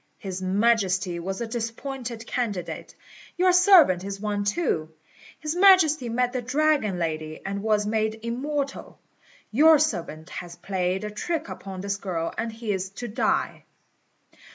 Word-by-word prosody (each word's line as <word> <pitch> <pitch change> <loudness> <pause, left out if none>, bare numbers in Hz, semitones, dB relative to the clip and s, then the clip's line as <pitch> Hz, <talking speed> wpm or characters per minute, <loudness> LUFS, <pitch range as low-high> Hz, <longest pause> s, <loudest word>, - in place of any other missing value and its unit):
His 190 -2 -6
Majesty 190 -3 +1
was 190 +5 -4
a - - -1
disappointed 235 +1 -5
candidate; 215 -8 -4 0.4
your 365 0 +4
servant 360 - +6
is 195 0 -5
one 205 -1 -2
too. 200 - 0 0.5
His 310 0 -3
Majesty 350 -9 +5
met 245 +2 0
the 255 - -1
Dragon 275 -5 +1
Lady, 155 -2 -3
and 200 +1 -3
was 210 -1 +1
made 220 +1 -1
immortal; 275 +4 -3 0.5
your 310 +7 +7
servant 175 - -2
has 175 -1 -7
played 185 +1 -2
a 210 - -4
trick 330 +9 -3
upon 190 -2 -7
this 200 0 -2
girl, 175 -4 -3
and 230 0 -3
he 220 -1 -4
is 190 -1 -2
to 240 +5 -7
die. 230 +3 -1
220 Hz, 145 wpm, -25 LUFS, 190-270 Hz, 0.5 s, your